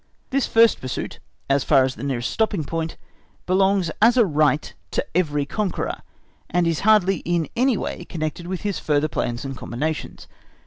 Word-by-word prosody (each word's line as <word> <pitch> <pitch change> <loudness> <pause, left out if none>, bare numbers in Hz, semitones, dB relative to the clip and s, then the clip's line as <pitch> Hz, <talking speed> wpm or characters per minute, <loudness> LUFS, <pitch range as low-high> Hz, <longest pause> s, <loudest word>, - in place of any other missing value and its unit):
This 275 0 +1
first 230 0 +4
pursuit, 130 - -5 0.3
as 140 0 +2
far 135 -3 +5
as 130 0 0
the - - -11
nearest 130 -4 -2
stopping 215 -7 0
point, 165 +2 -4 0.5
belongs 190 -2 +2
as 235 +3 +6
a 235 - +6
right 150 -3 +1 0.2
to - - -1
every 150 -5 +1
conqueror, 200 +4 -2 0.5
and 175 0 +2
is 165 -2 +1
hardly 200 -3 +4
in 170 -1 -1
any 250 -1 +3
way 175 - -4
connected 160 0 -4
with 185 -1 -4
his 205 -2 -2
further 150 0 +1
plans 120 -3 -3
and 135 0 -4
combinations. 150 +6 -4
165 Hz, 170 wpm, -23 LUFS, 145-195 Hz, 0.5 s, as